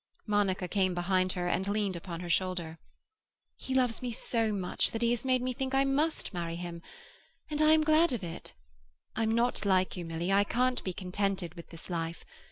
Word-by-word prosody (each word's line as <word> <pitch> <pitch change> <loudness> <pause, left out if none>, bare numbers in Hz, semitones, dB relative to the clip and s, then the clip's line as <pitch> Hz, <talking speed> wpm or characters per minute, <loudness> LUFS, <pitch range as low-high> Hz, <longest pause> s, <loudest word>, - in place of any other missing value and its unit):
Monica 200 -3 +1
came 185 -2 +1
behind 185 +1 +1
her, 175 -1 -2
and 190 +2 0
leaned 205 -2 0
upon 170 0 -6
her 175 - -5
shoulder. 175 -3 0 0.8
"He 265 - -4
loves 250 -3 +2
me 250 - -2
so 225 -1 0
much 190 -3 0
that 225 +1 -3
he 235 - +3
has 240 - 0
made 255 -1 +2
me 255 0 -1
think 265 +1 -2
I 270 - +5
must 285 -1 0
marry 170 -2 -3
him. 170 -1 -6 0.7
And 300 0 0
I 310 0 +6
am 315 0 +4
glad 315 +1 +4
of 235 -6 -2
it. 170 -1 -7 0.6
I'm 225 0 +1
not 240 0 +1
like 185 -2 +2
you, 180 - -4
Milly; 165 +2 -2
I 200 +1 +5
can't 250 +4 0
be 185 - -2
contented 190 -1 -2
with 170 -2 -11
this 165 -1 -10
life. 165 -2 -4
195 Hz, 200 wpm, -31 LUFS, 175-245 Hz, 0.8 s, I